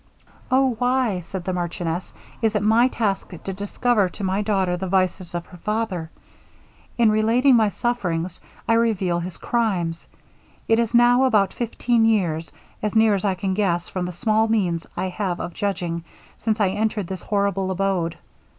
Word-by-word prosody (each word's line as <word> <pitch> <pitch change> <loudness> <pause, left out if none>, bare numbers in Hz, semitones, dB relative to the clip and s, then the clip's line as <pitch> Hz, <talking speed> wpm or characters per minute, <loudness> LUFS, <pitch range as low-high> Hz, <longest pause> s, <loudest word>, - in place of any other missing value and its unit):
'Oh! 260 0 +3
why,' 245 -6 +1
said 180 +1 -6
the 185 +1 -2
marchioness, 175 0 -3 0.3
'is 220 -1 +1
it 210 - +1
my 225 +4 +5
task 215 -6 -1
to 195 - -4
discover 205 +1 +1
to 200 - -8
my 190 +2 0
daughter 195 -4 +1
the 190 +2 -4
vices 185 -1 0
of 170 0 -3
her 180 - -14
father? 210 -4 -2 0.9
In 230 -3 +5
relating 230 +5 +4
my 220 -3 +4
sufferings, 185 -7 -2 0.3
I 230 - +4
reveal 200 -7 +1
his 175 0 -6
crimes! 185 -9 -1 0.6
It 225 0 +4
is 235 0 0
now 245 +2 +5
about 210 -6 +3
fifteen 235 0 0
years, 170 -8 +1 0.3
as 210 +1 -2
near 220 -1 +5
as 195 0 -1
I 195 -2 +1
can 190 0 -2
guess 180 -4 0
from 180 -1 -3
the - - -4
small 215 +5 +1
means 180 -7 0
I 185 - -1
have 185 -2 -2
of 175 - -5
judging, 175 -5 -2 0.4
since 220 -1 0
I 200 -3 +3
entered 210 +1 -1
this 185 +1 -6
horrible 200 -2 0
abode. 185 -3 -1
200 Hz, 170 wpm, -23 LUFS, 180-225 Hz, 0.9 s, my